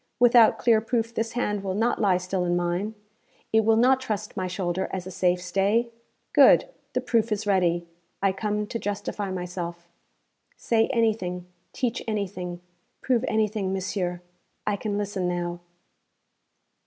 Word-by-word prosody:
Without 240 -2 +6
clear 225 -2 +3
proof 230 0 -1
this 225 0 -2
hand 210 -4 -1
will 190 -1 -2
not 225 +3 +1
lie 190 -3 +4
still 185 0 -2
in 175 0 +1
mine, 175 +5 -1 0.6
it 220 0 +5
will 225 +1 +4
not 255 +3 +4
trust 215 -4 -4
my 185 -2 -2
shoulder 180 0 -2
as 185 -2 -4
a 185 - -7
safe 180 0 +1
stay? 200 +6 +1 0.4
Good. - - +7 0.3
The - - 0
proof 230 -1 +1
is 210 0 -1
ready. 175 -4 +2 0.3
I 195 0 +2
come 210 +2 -2
to 230 +2 -4
justify 205 0 -3
myself.' 175 -2 -5 0.7
'Say 225 -1 +2
anything, 215 -7 0 0.3
teach 245 -1 -2
anything, 185 -5 -3 0.4
prove 250 -2 +1
anything, 215 -3 0
monsieur; 180 -2 -2 0.4
I 210 - +1
can 205 0 -3
listen 200 -3 -2
now.' 175 -1 -2
200 Hz, 150 wpm, -26 LUFS, 180-220 Hz, 0.7 s, Good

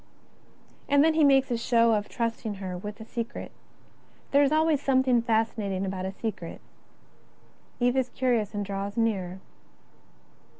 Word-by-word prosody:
And 285 0 +5
then 320 0 +4
he 315 -1 +3
makes 270 -2 +4
a 240 - +1
show 230 -1 +3
of 210 -1 -1
trusting 230 -3 -3
her 190 -2 -5
with 205 +4 -7
a 220 - -8
secret. 230 0 -5 0.8
There 280 - +5
is 280 0 +3
always 310 -2 +2
something 260 -3 +3
fascinating 220 -4 0
about 190 -1 -3
a - - -4
secret. 195 -4 -5 1.2
Eve 245 +1 +2
is 255 -1 +1
curious 240 -6 0
and 205 0 -2
draws 200 +1 -4
nearer. 190 -5 -1
230 Hz, 145 wpm, -27 LUFS, 200-260 Hz, 1.2 s, And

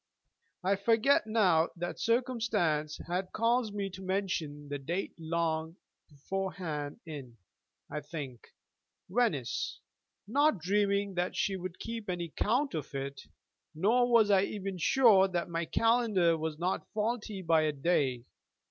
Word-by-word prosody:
I 195 +2 +2
forget 225 +4 +3
now 185 -7 +3
what 175 0 -4
circumstance 225 - 0
had 180 +2 -2
caused 230 -1 +1
me 200 -1 -1
to 185 +1 -9
mention 180 -7 -2
the 145 0 -4
date 170 +8 -3
long 160 0 -1 0.3
beforehand 160 0 -4
in, 135 -7 -8 0.5
I 150 - -4
think, 140 -5 -7 0.6
Venice, 185 - 0 0.5
not 285 +4 +3
dreaming 200 +2 +1
that 180 0 -1
she 225 -7 0
would 185 -1 -6
keep 230 -3 -6
any 175 -2 -2
count 250 - 0
of 150 -3 -5
it, 135 0 -4 0.5
nor 240 +9 +3
was 220 -3 +5
I 195 -1 +6
even 195 -3 -5
sure 210 -3 +5
that 175 -2 -2
my 170 0 -2
calendar 220 -6 +3
was 160 -1 -3
not 180 +3 -2
faulty 215 -3 -2
by 165 -1 +4
a 155 -1 +1
day. 135 -5 0
185 Hz, 135 wpm, -31 LUFS, 160-215 Hz, 0.6 s, I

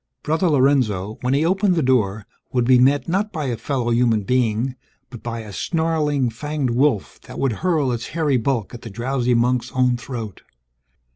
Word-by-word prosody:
Brother 160 +4 +1
Lorenzo, 130 -8 +1
when 125 +2 +1
he 150 +3 +2
opened 190 +1 +2
the 160 - +1
door, 110 -6 +1 0.3
would 125 -2 +1
be 125 0 +5
met 135 +1 +3
not 195 +5 0
by 155 -5 -3
a 125 -3 -1
fellow 120 +1 -2
human 115 -3 +2
being, 125 +2 0 0.4
but 120 - -9
by 115 -1 -5
a 105 -2 -10
snarling 150 - 0
fanged 145 +2 -2
wolf 125 -3 0
that - - -9
would 135 - +1
hurl 155 -7 +1
its 120 -1 -3
hairy 155 -5 0
bulk 120 -3 -1
at 120 - -8
the 115 - -8
drowsy 125 +3 0
monk's 125 +1 +1
own 125 -1 +2
throat. 115 -4 -7
125 Hz, 185 wpm, -21 LUFS, 115-145 Hz, 0.4 s, be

